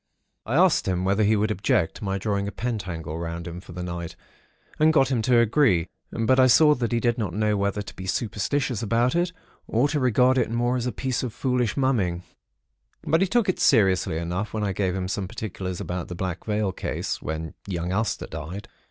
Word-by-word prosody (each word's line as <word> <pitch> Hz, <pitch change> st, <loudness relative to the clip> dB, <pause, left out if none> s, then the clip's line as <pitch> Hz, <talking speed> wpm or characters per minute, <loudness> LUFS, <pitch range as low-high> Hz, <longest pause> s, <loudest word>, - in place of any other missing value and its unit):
"I 120 Hz, -, -1 dB
asked 180 Hz, -, +4 dB
him 90 Hz, -1 st, 0 dB
whether 100 Hz, +3 st, +2 dB
he 105 Hz, +2 st, +4 dB
would 105 Hz, +1 st, +1 dB
object 95 Hz, -4 st, +1 dB
to -, -, -10 dB
my 95 Hz, -1 st, -1 dB
drawing 100 Hz, 0 st, -1 dB
a -, -, -3 dB
pentacle 90 Hz, -10 st, -4 dB
round 85 Hz, 0 st, -5 dB
him, 85 Hz, +1 st, -7 dB
for 95 Hz, -, -13 dB
the 90 Hz, +1 st, -5 dB
night, 85 Hz, -1 st, -5 dB, 0.6 s
and 155 Hz, +1 st, +5 dB
got 135 Hz, -4 st, +3 dB
him 120 Hz, -4 st, +1 dB
to 125 Hz, +1 st, +3 dB
agree; 115 Hz, -, +3 dB, 0.2 s
but 115 Hz, +3 st, +2 dB
I 130 Hz, -, +7 dB
saw 150 Hz, +4 st, +6 dB
that 120 Hz, -4 st, -2 dB
he 120 Hz, -, +2 dB
did 120 Hz, 0 st, 0 dB
not 95 Hz, -5 st, -2 dB
know 105 Hz, 0 st, +1 dB
whether 100 Hz, +1 st, -1 dB
to -, -, -11 dB
be 95 Hz, -, -7 dB
superstitious 115 Hz, +5 st, -1 dB
about 120 Hz, +5 st, +1 dB
it, 175 Hz, +1 st, +1 dB, 0.4 s
or 120 Hz, +6 st, +2 dB
to 150 Hz, -, 0 dB
regard 130 Hz, +1 st, +3 dB
it 120 Hz, -, +1 dB
more 120 Hz, +2 st, 0 dB
as 125 Hz, -1 st, -1 dB
a -, -, 0 dB
piece 130 Hz, +2 st, -2 dB
of 125 Hz, -4 st, -4 dB
foolish 125 Hz, -3 st, 0 dB
mumming; 100 Hz, -11 st, +1 dB, 0.8 s
but 165 Hz, +2 st, +2 dB
he 195 Hz, -, +3 dB
took 235 Hz, +2 st, +2 dB
it 185 Hz, -, 0 dB
seriously 95 Hz, -, +3 dB
enough, 90 Hz, +6 st, -3 dB
when 105 Hz, -, -1 dB
I 100 Hz, -2 st, 0 dB
gave 95 Hz, -1 st, -1 dB
him 95 Hz, -1 st, -2 dB
some 95 Hz, 0 st, -3 dB
particulars 95 Hz, -3 st, -5 dB
about 90 Hz, -1 st, -4 dB
the 90 Hz, -, -6 dB
Black 90 Hz, 0 st, -4 dB
Veil 105 Hz, -2 st, 0 dB
case, -, -, -4 dB
when 80 Hz, 0 st, -4 dB
young 90 Hz, -2 st, -3 dB
Aster 105 Hz, +3 st, -1 dB
died. 95 Hz, +6 st, -7 dB
105 Hz, 215 wpm, -25 LUFS, 90-125 Hz, 0.8 s, I